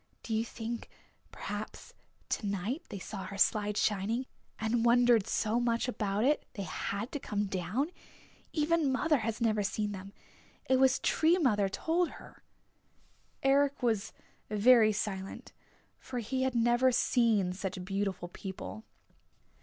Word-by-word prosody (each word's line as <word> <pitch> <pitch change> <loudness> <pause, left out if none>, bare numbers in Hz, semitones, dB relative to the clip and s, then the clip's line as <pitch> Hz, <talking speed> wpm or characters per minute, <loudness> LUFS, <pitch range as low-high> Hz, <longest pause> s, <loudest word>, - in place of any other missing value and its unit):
Do 225 - -4
you 220 +1 +2
think 230 0 -6 0.4
perhaps, - - -6 0.4
to 210 - -1
night 200 - -2
they 200 - -5
saw 190 0 -6
our 200 - -7
slide 210 +1 +2
shining, 215 +5 0 0.3
and 225 +1 0
wondered 240 -3 +5
so 220 +2 +1
much 235 0 +1
about 210 -4 -1
it 295 +4 +3
they 200 - -3
had 200 +4 -4
to 290 - -3
come 205 -5 -2
down? 195 - -2 0.6
Even 310 -2 +2
mother 300 +2 +2
has 225 0 -2
never 220 -3 +2
seen 205 +1 -1
them. 195 0 -7 0.6
It 260 0 +4
was 265 0 +5
Tree 330 +3 +3
Mother 210 - +2
told 335 - 0
her." - - -14 1.0
Eric 275 0 +3
was 220 -4 +1 0.4
very 215 +1 +6
silent, 195 -2 -4 0.5
for 255 - -6
he 250 +3 -2
had 260 -1 0
never 240 +2 +4
seen 225 -7 +2
such 185 -1 -5
beautiful 195 -2 -2
people. 190 +4 -7
225 Hz, 140 wpm, -31 LUFS, 200-255 Hz, 1.0 s, very